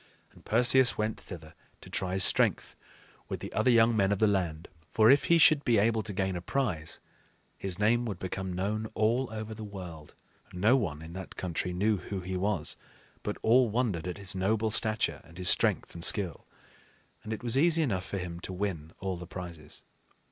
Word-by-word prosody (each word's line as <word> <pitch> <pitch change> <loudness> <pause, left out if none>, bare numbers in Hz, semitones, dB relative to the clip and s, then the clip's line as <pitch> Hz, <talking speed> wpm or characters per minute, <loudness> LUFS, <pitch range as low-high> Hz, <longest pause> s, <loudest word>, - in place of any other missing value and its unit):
And - - -19
Perseus 125 +3 +4
went 110 0 -2
thither 80 -4 -10 0.3
to - - -13
try 95 -1 -2
his 95 0 +4
strength - - +3 0.5
with - - -4
the - - -8
other 130 - +2
young 115 -1 +5
men 100 -2 +2
of 100 - +1
the 110 - +3
land; 90 -6 -1 0.2
for 110 +2 +5
if 140 - +4
he 170 - +5
should 155 -2 +5
be 120 -3 +3
able 110 +2 +2
to 105 - -6
gain 95 -1 -1
a 85 - -4
prize, 85 - -3 0.6
his 95 -3 -4
name 120 +3 +2
would 105 -6 -4
become 95 +1 -4
known 105 +4 -2
all 115 +3 +1
over 110 0 -5
the 110 0 -8
world. 90 -7 -9 0.4
No 105 +8 +3
one 80 - -2
in 80 +1 -10
that 95 0 -8
country 90 0 -3
knew 105 +4 +1
who 95 +1 -6
he 95 +1 -5
was, 95 -3 -1 0.5
but - - -4
all 120 +1 +4
wondered 105 -7 -1
at 90 - -4
his 100 -2 -2
noble 110 +4 0
stature 110 0 0
and 85 +1 -16
his 90 -1 +2
strength - - +1
and 85 - -7
skill; 95 -6 +2 0.8
and 110 - -7
it 110 - -5
was 120 0 0
easy 165 +3 +4
enough 95 -10 -2
for 100 - -4
him 85 -2 -5
to 90 - -6
win 90 -5 -4
all 95 -2 -3
the 85 0 -9
prizes. 85 -4 -9
100 Hz, 200 wpm, -29 LUFS, 90-110 Hz, 0.8 s, young